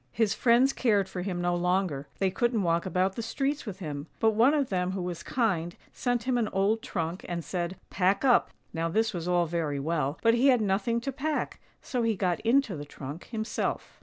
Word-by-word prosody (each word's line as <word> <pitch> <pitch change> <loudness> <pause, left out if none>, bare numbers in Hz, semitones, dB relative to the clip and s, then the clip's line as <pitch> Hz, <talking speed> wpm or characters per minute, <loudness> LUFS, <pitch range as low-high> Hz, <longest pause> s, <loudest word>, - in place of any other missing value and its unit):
His 220 - +1
friends 250 +4 +4
cared 205 -6 +2
for 185 -1 -5
him 180 -1 -3
no 175 0 +1
longer, 175 -5 0
they 195 -1 +1
couldn't 235 -1 +1
walk 170 +1 +1
about 185 +1 +1
the - - -3
streets 275 +4 -2
with 195 -3 -5
him; 150 -5 -5
but 225 - +4
one 235 +7 +4
of 280 -4 +1
them 180 -1 0
who 190 - -3
was 175 -1 -4
kind 180 -8 -1 0.2
sent 245 -2 -1
him 255 -1 +1
an 225 - +1
old 205 +3 +1
trunk, 170 -2 -3
and 170 -2 -3
said, 175 0 -3
" - - -44
Pack 195 +6 +2
up." 245 -2 +4 0.2
Now 165 0 -1
this 220 +5 +1
was 175 -1 -4
all 175 -1 +3
very 160 -4 -2
well, 150 -1 -1
but 230 0 +5
he 240 +4 +4
had 255 -3 +5
nothing 215 +3 0
to 275 - -3
pack, 295 +3 -3 0.2
so 250 - -2
he 230 -1 +1
got 180 -3 0
into 230 -3 +2
the 145 - -6
trunk 145 +2 -8
himself. 220 -1 -3
195 Hz, 220 wpm, -28 LUFS, 175-230 Hz, 0.2 s, but